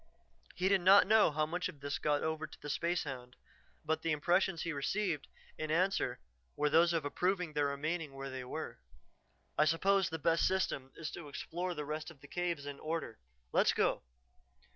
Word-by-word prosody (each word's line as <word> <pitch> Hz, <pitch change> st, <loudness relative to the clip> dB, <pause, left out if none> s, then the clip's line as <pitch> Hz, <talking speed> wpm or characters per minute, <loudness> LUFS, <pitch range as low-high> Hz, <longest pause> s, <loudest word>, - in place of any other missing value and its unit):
He 185 Hz, -, +1 dB
did 195 Hz, -1 st, +4 dB
not 195 Hz, +3 st, +8 dB
know 215 Hz, +2 st, +5 dB
how 155 Hz, 0 st, 0 dB
much 175 Hz, +4 st, -2 dB
of 160 Hz, -6 st, -11 dB
this 140 Hz, 0 st, -3 dB
got 145 Hz, -1 st, +1 dB
over 160 Hz, 0 st, -2 dB
to -, -, -14 dB
the 150 Hz, -, -7 dB
spacehound, 135 Hz, -7 st, -2 dB, 0.5 s
but 160 Hz, +1 st, 0 dB
the 165 Hz, -, 0 dB
impressions 175 Hz, +3 st, +2 dB
he 170 Hz, -, -2 dB
received 155 Hz, +2 st, -1 dB, 0.3 s
in 155 Hz, 0 st, -3 dB
answer 185 Hz, +5 st, +1 dB, 0.4 s
were 150 Hz, 0 st, +1 dB
those 170 Hz, +2 st, +5 dB
of 165 Hz, -3 st, 0 dB
approving 180 Hz, +2 st, 0 dB
their 145 Hz, -1 st, +2 dB
remaining 150 Hz, +1 st, -3 dB
where 135 Hz, 0 st, -6 dB
they 130 Hz, -1 st, -5 dB
were. 125 Hz, -, -6 dB, 0.8 s
"I 150 Hz, -, +6 dB
suppose 190 Hz, +4 st, +3 dB
the 160 Hz, -, -3 dB
best 165 Hz, +1 st, +3 dB
system 140 Hz, -8 st, -1 dB
is 160 Hz, -1 st, -5 dB
to 170 Hz, -, -8 dB
explore 175 Hz, +5 st, -4 dB
the 150 Hz, -1 st, -4 dB
rest 155 Hz, +2 st, -4 dB
of 160 Hz, -4 st, -14 dB
the 145 Hz, -, -14 dB
caves 170 Hz, -3 st, -2 dB
in 145 Hz, -1 st, -6 dB
order; 160 Hz, -8 st, -4 dB, 0.3 s
let's -, -, +4 dB
go." -, -, +1 dB
160 Hz, 185 wpm, -34 LUFS, 145-175 Hz, 0.8 s, not